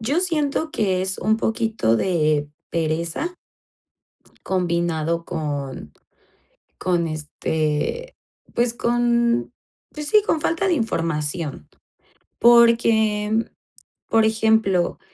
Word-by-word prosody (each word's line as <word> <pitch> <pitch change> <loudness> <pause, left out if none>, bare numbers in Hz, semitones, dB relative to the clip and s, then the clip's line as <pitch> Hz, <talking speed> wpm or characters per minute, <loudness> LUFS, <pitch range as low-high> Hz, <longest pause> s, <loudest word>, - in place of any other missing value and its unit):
Yo 280 +10 0
siento 315 -3 -1
que 190 -7 0
es 190 0 +1
un 220 +1 +1
poquito 225 - 0
de 155 -3 +1 0.2
pereza 170 - -2 1.1
combinado 170 -2 -1
con 145 - -5 0.9
con 175 -2 0
este, 155 - -2 0.4
pues 235 0 +1
con 235 0 +1 0.4
pues 300 0 -6
sí, 425 -1 +5
con 325 - 0
falta 335 +5 0
de 355 - +3
información. 165 - -2 0.7
Porque, 225 -2 +4 0.6
por 225 -1 +3
ejemplo, 220 -5 +2
210 Hz, 90 wpm, -22 LUFS, 165-235 Hz, 1.1 s, sí